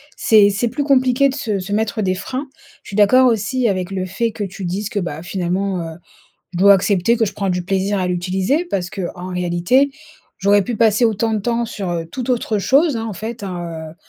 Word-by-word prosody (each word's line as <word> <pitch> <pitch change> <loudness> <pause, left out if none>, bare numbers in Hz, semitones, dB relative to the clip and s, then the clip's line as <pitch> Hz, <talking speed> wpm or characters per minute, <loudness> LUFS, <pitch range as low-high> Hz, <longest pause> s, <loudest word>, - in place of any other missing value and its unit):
c'est 210 -3 +5
c'est 205 +4 -1
plus 275 +4 -3
compliqué 260 -1 +3
de 265 - -4
se 215 -8 -2
se 190 +2 -5
mettre 215 0 -1
des 185 -2 0
freins. 255 +9 -5 0.4
Je - - -13
suis - - -6
d'accord 255 +5 +5
aussi 230 +2 +1
avec 185 -2 -2
le 185 -1 -2
fait 230 +5 -2
que 210 -1 -4
tu 195 0 -8
dises 190 +4 -2
que, 210 - -2
bah, 160 -3 -5
finalement, 185 +1 -2
heu, 165 -1 -7 0.6
je 175 - -4
dois 200 +1 +8
accepter 200 +3 +2
que 225 - +2
je 200 - -4
prends 195 -2 -2
du 180 -1 -1
plaisir 195 +1 0
à 185 - 0
l'utiliser 185 - 0
parce 185 - -3
qu'en 180 -1 -5
réalité, 180 +10 +2 0.5
j'aurais 200 +1 +3
pu 240 +4 -3
passer 220 +1 +3
autant 225 0 0
de 215 - 0
temps 235 +3 -1
sur, 200 -5 -5
heu, 165 -1 -3
tout 245 +9 -6
autre 230 -4 0
chose, 275 - +3
hein, 225 0 -3
en 220 - -4
fait, 220 +4 -6
hein, 170 -4 -6
heu - - -17
200 Hz, 225 wpm, -19 LUFS, 185-235 Hz, 0.6 s, dois